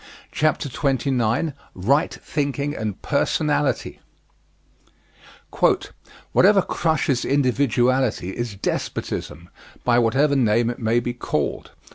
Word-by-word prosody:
CHAPTER 155 Hz, -1 st, 0 dB
XXIX 135 Hz, 0 st, 0 dB, 0.2 s
RIGHT 135 Hz, -, +1 dB
THINKING 145 Hz, 0 st, -2 dB
AND 105 Hz, -3 st, -5 dB
PERSONALITY 150 Hz, 0 st, 0 dB, 2.3 s
Whatever 195 Hz, 0 st, +5 dB
crushes 155 Hz, -6 st, 0 dB
individuality 130 Hz, -6 st, +1 dB
is 120 Hz, 0 st, -4 dB
despotism, 85 Hz, -3 st, -4 dB, 0.3 s
by 120 Hz, -1 st, +3 dB
whatever 135 Hz, +5 st, +2 dB
name 120 Hz, -2 st, +2 dB
it 120 Hz, -, -9 dB
may 115 Hz, +1 st, +2 dB
be 120 Hz, 0 st, -3 dB
called. 120 Hz, -, -3 dB
130 Hz, 90 wpm, -22 LUFS, 115-145 Hz, 2.3 s, Whatever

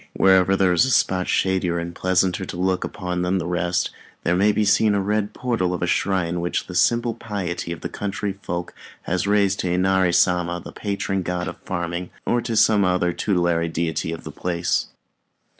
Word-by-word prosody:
Wherever 95 Hz, 0 st, +4 dB
there 95 Hz, -2 st, +3 dB
is 90 Hz, -, +4 dB
a -, -, -1 dB
spot 95 Hz, -7 st, +2 dB
shadier 95 Hz, -2 st, +1 dB
and 85 Hz, 0 st, -4 dB
pleasanter 95 Hz, +1 st, +1 dB
to 90 Hz, -, -6 dB
look 95 Hz, 0 st, 0 dB
upon 90 Hz, -2 st, -3 dB
than 90 Hz, +2 st, +1 dB
the 90 Hz, -, -2 dB
rest, 90 Hz, +1 st, 0 dB, 0.3 s
there 90 Hz, -, +2 dB
may 100 Hz, +3 st, +4 dB
be 105 Hz, 0 st, +1 dB
seen 105 Hz, +1 st, +4 dB
the 100 Hz, -, +2 dB
red 105 Hz, +1 st, -1 dB
portal 115 Hz, -8 st, -1 dB
of 85 Hz, -, -4 dB
a -, -, +3 dB
shrine 90 Hz, -1 st, 0 dB
which 85 Hz, -, -2 dB
the 90 Hz, -, -9 dB
simple 120 Hz, +5 st, +2 dB
piety 100 Hz, -7 st, -4 dB
of 85 Hz, -, -6 dB
the -, -, -3 dB
country 100 Hz, 0 st, -3 dB
folk 85 Hz, -2 st, -4 dB, 0.3 s
has 90 Hz, +2 st, -1 dB
raised 100 Hz, -1 st, +2 dB
to 90 Hz, -, -1 dB
Inari 95 Hz, 0 st, +2 dB
Sama, 85 Hz, -1 st, +2 dB
the -, -, -10 dB
patron 100 Hz, -2 st, -2 dB
god 90 Hz, 0 st, -3 dB
of -, -, -6 dB
farming, 85 Hz, 0 st, -3 dB, 0.2 s
or 120 Hz, -, +1 dB
to 115 Hz, -2 st, -2 dB
some 105 Hz, -2 st, +5 dB
other 90 Hz, -1 st, +1 dB
tutelary 85 Hz, -3 st, 0 dB
deity 80 Hz, 0 st, -2 dB
of 85 Hz, -, -6 dB
the -, -, -7 dB
place. 85 Hz, -1 st, -1 dB
90 Hz, 195 wpm, -22 LUFS, 85-100 Hz, 0.3 s, some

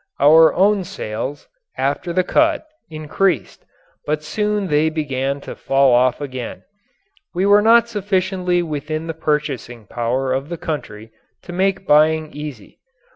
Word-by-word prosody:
Our 160 Hz, +3 st, +7 dB
own 200 Hz, +1 st, +3 dB
sales, 130 Hz, -1 st, -6 dB, 0.3 s
after 145 Hz, +6 st, -1 dB
the 185 Hz, +2 st, +1 dB
cut, 315 Hz, -, +1 dB, 0.2 s
increased, 155 Hz, -, -2 dB, 0.4 s
but 150 Hz, 0 st, -1 dB
soon 210 Hz, +4 st, -1 dB
they 155 Hz, -2 st, +2 dB
began 140 Hz, -3 st, -2 dB
to -, -, -8 dB
fall 135 Hz, -1 st, +2 dB
off 125 Hz, 0 st, +3 dB
again. 130 Hz, -4 st, -6 dB, 0.7 s
We 185 Hz, +2 st, +1 dB
were 205 Hz, +1 st, +6 dB
not 230 Hz, +2 st, +5 dB
sufficiently 190 Hz, -4 st, -1 dB
within 155 Hz, 0 st, -4 dB
the 165 Hz, -, -4 dB
purchasing 145 Hz, -7 st, -3 dB
power 125 Hz, +4 st, -2 dB
of 135 Hz, +3 st, -3 dB
the 170 Hz, -, -5 dB
country 110 Hz, -9 st, -6 dB, 0.3 s
to 175 Hz, -, -9 dB
make 190 Hz, +1 st, 0 dB
buying 155 Hz, 0 st, +3 dB
easy. 145 Hz, -8 st, -9 dB
155 Hz, 135 wpm, -19 LUFS, 135-185 Hz, 0.7 s, Our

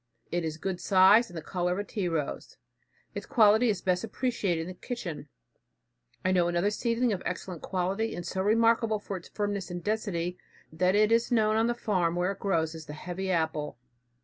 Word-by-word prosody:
It 175 Hz, 0 st, 0 dB
is 160 Hz, -1 st, -3 dB
good 180 Hz, +1 st, -4 dB
size, 200 Hz, +5 st, +6 dB
and 175 Hz, -, -9 dB
the 160 Hz, -, -6 dB
color 180 Hz, -1 st, -1 dB
of -, -, -4 dB
a 205 Hz, -, -1 dB
tea 205 Hz, -2 st, -3 dB
rose. 160 Hz, -4 st, -3 dB, 0.6 s
Its -, -, -6 dB
quality 220 Hz, +1 st, +5 dB
is 200 Hz, -4 st, -1 dB
best 180 Hz, 0 st, +1 dB
appreciated 220 Hz, -7 st, -1 dB
in 165 Hz, -, -5 dB
the -, -, -6 dB
kitchen. 180 Hz, -, -6 dB, 1.0 s
I 185 Hz, -, +3 dB
know 180 Hz, -2 st, +3 dB
another 175 Hz, +4 st, +1 dB
seedling 235 Hz, +1 st, 0 dB
of 185 Hz, -, -4 dB
excellent 180 Hz, -2 st, -5 dB
quality 195 Hz, +4 st, -1 dB
and 175 Hz, -, -6 dB
so 190 Hz, +2 st, -2 dB
remarkable 225 Hz, +1 st, +3 dB
for 205 Hz, -1 st, -6 dB
its 175 Hz, -, -9 dB
firmness 205 Hz, -3 st, -3 dB
and 175 Hz, -1 st, -5 dB
density, 185 Hz, -5 st, -2 dB, 0.3 s
that 180 Hz, +4 st, +2 dB
it 215 Hz, +1 st, +4 dB
is 230 Hz, +2 st, +2 dB
known 215 Hz, -2 st, +3 dB
on 225 Hz, +1 st, +3 dB
the 240 Hz, -, 0 dB
farm 180 Hz, -7 st, 0 dB
where 180 Hz, +2 st, +1 dB
it 200 Hz, -, -8 dB
grows 165 Hz, -5 st, 0 dB
as 160 Hz, -3 st, -9 dB
the 150 Hz, -, -7 dB
"heavy 180 Hz, +4 st, -5 dB
apple." 160 Hz, -6 st, -1 dB
190 Hz, 200 wpm, -28 LUFS, 175-215 Hz, 1.0 s, size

